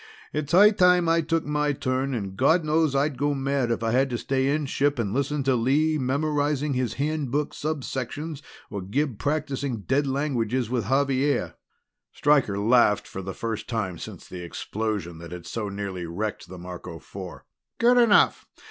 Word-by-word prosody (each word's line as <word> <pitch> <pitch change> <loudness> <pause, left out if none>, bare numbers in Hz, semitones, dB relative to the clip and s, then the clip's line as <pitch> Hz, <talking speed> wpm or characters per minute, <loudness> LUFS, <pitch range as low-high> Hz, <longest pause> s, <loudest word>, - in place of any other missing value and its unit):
"It's 150 -1 -2
high 205 +4 +7
time 180 -3 +4
I 165 0 +3
took 165 +1 -1
my 150 0 0
turn 130 0 -1
and 100 -4 -4
God 160 - +3
knows 155 -2 +2
I'd 140 0 0
go 145 0 +1
mad 135 -2 0
if 115 -1 -1
I 115 - +1
had 135 +3 +2
to 120 - -2
stay 130 +2 0
inship 145 -1 0
and 105 -4 -1
listen 140 +2 0
to 135 0 +2
Lee 145 +6 +2
memorizing 145 +1 0
his 125 -2 -1
Handbook 145 -1 -1
subsections 145 0 -4 0.3
or 100 - -4
to 90 - -9
Gib 130 0 -1
practicing 140 -5 -2
dead 140 +7 +1
languages 130 -4 -1
with 120 -5 -1
Xavier." 140 +1 +1 0.6
Stryker 140 -9 +2
laughed 105 0 +3
for 95 - -6
the 95 0 -6
first 115 -2 -4
time 100 -8 -2
since - - -9
the 90 - -8
explosion 95 -1 -4
that 85 0 -10
had 90 -1 -8
so 110 -3 -4
nearly 100 -3 -5
wrecked 105 +6 -4
the 95 - -9
Marco 90 -1 -8
Four. 70 - -9 0.3
"Good 245 +2 +4
enough. 230 -4 +4
135 Hz, 175 wpm, -25 LUFS, 110-150 Hz, 0.6 s, high